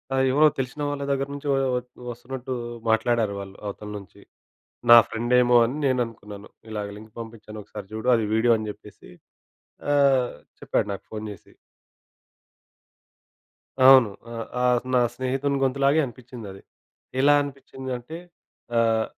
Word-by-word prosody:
ఆ! - - 0
ఎవరో 150 +3 +6
తెలిసిన 130 +3 -4
వాళ్ళ 140 -1 -3
దగ్గర 135 0 0
నుంచి 145 +1 -7
ఒ - - +1 0.2
ఒ - - +1 0.3
ఒస్తున్నట్టు 130 +2 -6 0.4
మాట్లాడారు 110 -2 +2
వాళ్ళు 100 0 -9
అవతల 105 +1 -6
నుంచి. 100 -2 -13 0.7
నా 120 - +12
ఫ్రెండేమో 120 +1 +3
అని 125 +5 -2
నేను 130 -2 +2
అనుకున్నాను. 105 -2 -11 0.2
ఇలాగ 105 -1 -4
లింక్ 110 0 -13
పంపించాను 110 -2 -9
ఒకసారి 105 0 -9
చూడు. 110 +3 -4
అది 115 -2 +1
వీడియో 115 +2 +4
అని 110 -1 -5
చెప్పేసి. - - -13 0.8
ఆహ్, 135 -3 +3 0.3
చెప్పాడు - - -1
నాకు 100 - -8
ఫోన్ 110 0 -5
చేసి. 100 - -14 2.3
అవును. 130 -5 +8 0.2
ఆహ్, 115 -1 -4 0.2
ఆ - - +1 0.3
నా 125 - +5
స్నేహితుని 135 +2 -1
గొంతులాగే 140 +3 +3
అనిపించిందది. 115 -5 -10 0.6
ఎలా 145 +1 +6
అనిపించిందంటే 135 0 -7 0.6
ఆహ్, 115 -1 +2
120 Hz, 130 wpm, -25 LUFS, 110-135 Hz, 2.3 s, నా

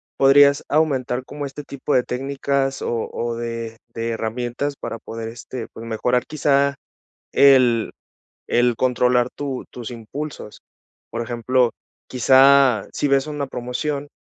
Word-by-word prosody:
podrías 140 +1 +5
aumentar 130 -5 0
como 145 +1 -6
este 140 +1 -7
tipo 140 +1 -4
de 125 - +4
técnicas, 135 +1 -2
o 115 -1 -2
o 120 0 -3
de 115 -1 -5 0.2
de 115 0 -3
herramientas 120 +5 -3
para 115 - -5
poder 115 0 -7
este 115 +1 -7
pues 115 - -9
mejorar, 125 +2 0
quizá, 140 -2 +1 0.6
el 125 -5 +5 0.6
el 120 0 +3
controlar 125 0 +2
tu 140 -3 -5
tus 120 0 -7
impulsos. 120 0 -7 0.5
Por 115 - -3
ejemplo, 120 +1 +1 0.4
quizá, 130 -2 +5
si 145 - -1
ves 135 0 +2
una 145 -2 -3
promoción 140 +4 -4
125 Hz, 130 wpm, -21 LUFS, 115-140 Hz, 0.6 s, podrías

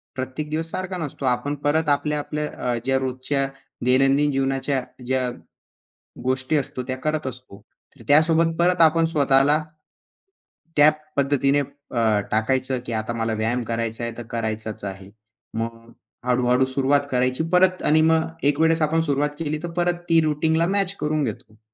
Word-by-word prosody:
प्रत्येक 130 +4 -4
दिवस 160 +2 -3
सारखा 185 0 -4
नसतो. 150 -4 -5
आपण 125 +3 0
परत 155 +1 +2
आपल्या-आपल्या 150 +1 -1 0.2
अ, - - 0
ज्या 135 0 +2
रोजच्या 130 +1 -1 0.4
दैनंदिन 135 +3 +3
जीवनाच्या 135 0 0 0.2
ज्या 130 0 0 0.9
गोष्टी 130 +4 0
असतो 130 -2 -3
त्या 130 - -3
करत 155 -2 -1
असतो. 125 -5 -9 0.5
त्यासोबत 160 +2 +4
परत 180 0 +3
आपण 165 +1 +5
स्वतःला 145 -1 +3 1.1
त्या 150 0 +8 0.3
पद्धतीने 140 0 +2
अ, 130 -6 -1
टाकायचं 130 +4 0
की 120 - -5
आता 110 +1 -2
मला 115 -1 -1
व्यायाम 115 +3 -1
करायचा 115 0 -3
आहे 115 - -2
तर 120 - -6
करायचाच 110 -2 -4
आहे. 95 0 -7 0.5
मग 115 0 -5 0.3
हळू-हळू 125 +1 +3
सुरुवात 135 +2 +2
करायची 130 +3 +1
परत 185 0 +4
आणि 155 +1 +4
मग 160 0 +2 0.2
एक 145 0 -1
वेळेस 160 0 +3
आपण 160 +2 +2
सुरुवात 145 -2 0
केली 155 -1 -2
तर 175 - -3
परत 175 0 0
ती 165 0 +5
रुटीनला 160 +2 +1
मॅच 195 0 0
करून 150 0 0
घेतो. 110 -2 -6
140 Hz, 150 wpm, -23 LUFS, 125-155 Hz, 1.1 s, त्या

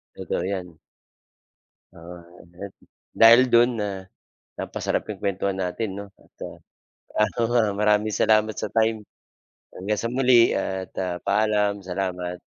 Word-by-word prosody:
Totoo - - -3
'yan. 90 -4 -5 1.2
Oo, 85 +1 -11 0.3
ayan. 90 +4 -10 0.4
Dahil 115 +2 +8
do'n 120 +1 +5
na 105 - -1 0.7
napasarap - - -2
'yong 105 -3 -6
kuwentuhan 100 -1 -2
natin 95 +3 -3
'no, 100 - -7
at - - -27
ah, - - -11 0.7
ano 110 +3 -4
nga, 120 -2 +4 0.2
maraming 105 0 +2
salamat 110 0 +3
sa - - -3
time 110 0 +2 0.7
hanggang 105 +2 -3
sa 115 +1 -3
muli 125 -2 +4
at 95 -1 -3
ah, 90 -2 -2
paalam. 105 0 +1
Salamat. 90 -1 -4
100 Hz, 130 wpm, -24 LUFS, 95-110 Hz, 1.2 s, Dahil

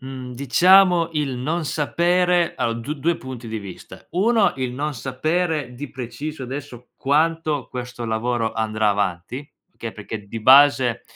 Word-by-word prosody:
Mhmm, 130 -1 -7
diciamo, 175 +6 +5
il 145 -4 -1
non 155 +6 -2
sapere 175 +4 +1
a - - -1
ho 115 - -2
d 115 +6 -4
due 165 +5 +1
punti 125 -3 -8
di 110 0 -4
vista. 100 -3 -11
1, 215 +3 +3
il 130 -2 -2
non 150 +4 -3
sapere 145 +2 -2
di 140 +2 -7
preciso, 130 +4 -6
adesso, 125 -2 -7
quanto 155 0 +1
questo 125 -1 -6
lavoro 115 +1 -1
andrà 110 -1 0
avanti, 100 - -3 0.3
che 115 -1 -6
perché 105 0 -7
di 115 +2 -6
base, 130 -1 +5
130 Hz, 150 wpm, -22 LUFS, 115-155 Hz, 0.3 s, diciamo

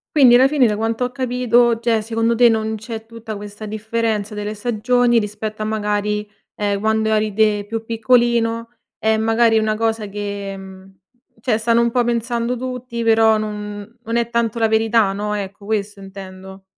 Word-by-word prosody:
Quindi 260 -5 +7
alla 260 +2 +6
fine, 280 -4 +3
da 210 - 0
quanto 225 +3 -1
ho 245 - -4
capito, 245 -3 +2
cioè, 230 -2 +1
secondo 225 +1 0
te 240 +1 +6
non 220 -1 0
c'è 220 +1 -7
tutta 225 -2 -8
questa 205 +1 -9
differenza 220 0 -2
delle 210 0 -4
stagioni, 240 +2 +2
rispetto 215 0 -5
a - - -1
magari, 210 -1 -1 0.3
ehm, 200 -1 -1
quando 220 0 +1
eri 215 0 +1
te 210 -1 +2
più 225 +1 -5
piccolino, 230 0 +1 0.3
è 220 0 +2
magari 225 +1 +3
è - - +5
una 215 0 0
cosa 225 -1 -1
che 200 -1 -5
mhmm, 190 0 -12 0.5
cioè 225 -1 0
stanno 230 +1 +2
un 235 0 +2
po' 245 +1 +2
pensando 235 +1 -1
tutti, 250 -1 -5
però 225 -1 +5
non 210 +1 -6
non 230 +1 -2
è 235 -1 0
tanto 235 -1 -1
la 225 - +3
verità, 220 -2 +2
no, 210 +1 -3
ecco, 200 0 -5
questo 205 -1 -3
intendo. 190 0 -11
220 Hz, 180 wpm, -19 LUFS, 210-235 Hz, 0.5 s, Quindi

